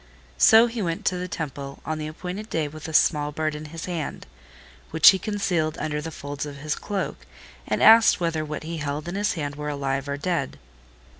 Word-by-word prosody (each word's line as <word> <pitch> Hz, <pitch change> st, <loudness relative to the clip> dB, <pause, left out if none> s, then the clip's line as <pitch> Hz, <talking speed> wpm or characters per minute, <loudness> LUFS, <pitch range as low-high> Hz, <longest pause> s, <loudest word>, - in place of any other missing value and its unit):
So 225 Hz, -, +8 dB
he 235 Hz, -1 st, -4 dB
went 180 Hz, +3 st, -3 dB
to 185 Hz, -, +1 dB
the 180 Hz, -, -4 dB
temple 140 Hz, -4 st, -6 dB
on 155 Hz, 0 st, -3 dB
the 155 Hz, -, -4 dB
appointed 180 Hz, +7 st, -6 dB
day 155 Hz, -2 st, -1 dB
with 155 Hz, +2 st, -9 dB
a -, -, -6 dB
small 150 Hz, -1 st, +3 dB
bird 155 Hz, 0 st, -2 dB
in 150 Hz, +1 st, -7 dB
his 165 Hz, +2 st, -7 dB
hand, 170 Hz, -4 st, -4 dB, 0.6 s
which 160 Hz, -1 st, +8 dB
he 190 Hz, -, +3 dB
concealed 180 Hz, -7 st, -1 dB
under 150 Hz, -1 st, -2 dB
the 165 Hz, -, -5 dB
folds 145 Hz, -1 st, -6 dB
of 145 Hz, -, -8 dB
his 150 Hz, +2 st, -2 dB
cloak, 200 Hz, -2 st, -3 dB, 0.5 s
and -, -, 0 dB
asked 225 Hz, 0 st, +7 dB
whether 165 Hz, -2 st, -1 dB
what 150 Hz, 0 st, -5 dB
he 165 Hz, +1 st, -5 dB
held 150 Hz, +1 st, -4 dB
in 175 Hz, -, -4 dB
his 205 Hz, +1 st, 0 dB
hand 145 Hz, -4 st, -4 dB
were 150 Hz, 0 st, -4 dB
alive 140 Hz, -1 st, -2 dB
or 140 Hz, -, -2 dB
dead. 155 Hz, -3 st, -2 dB
155 Hz, 210 wpm, -24 LUFS, 150-180 Hz, 0.6 s, So